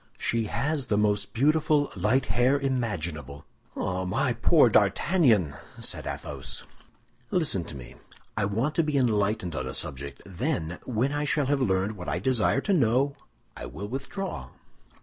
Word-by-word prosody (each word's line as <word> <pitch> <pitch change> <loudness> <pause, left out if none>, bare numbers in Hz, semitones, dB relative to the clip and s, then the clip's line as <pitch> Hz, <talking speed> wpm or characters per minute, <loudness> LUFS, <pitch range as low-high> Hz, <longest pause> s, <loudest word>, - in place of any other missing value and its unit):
"She 115 -1 0
has 140 +5 -1
the 105 - +1
most 105 -1 +1
beautiful 150 +3 +2
light 110 +8 +2
hair 125 +3 +3
imaginable!" 85 - -3 0.3
"Ah, 95 0 -2
my 120 +8 0
poor 125 +4 +5
D'Artagnan!" 110 - +3 0.2
said - - -2
Athos. - - -5 0.7
"Listen 155 - +1
to 75 - -8
me! - - -10 0.4
I 105 - +1
want 115 +9 0
to 165 - +4
be 150 -2 0
enlightened 105 - +1
on 65 -1 -3
a 65 - -4
subject; 70 -1 -2
then, 90 - -2
when 125 +4 0
I 145 0 -1
shall 145 0 +1
have 140 +1 +1
learned 100 -1 +1
what 90 - -5
I - - 0
desire 125 +5 +2
to 200 - +1
know, 135 -1 +2 0.4
I - - -7
will 80 +12 -6
withdraw." 140 - -5
115 Hz, 155 wpm, -27 LUFS, 95-140 Hz, 0.7 s, poor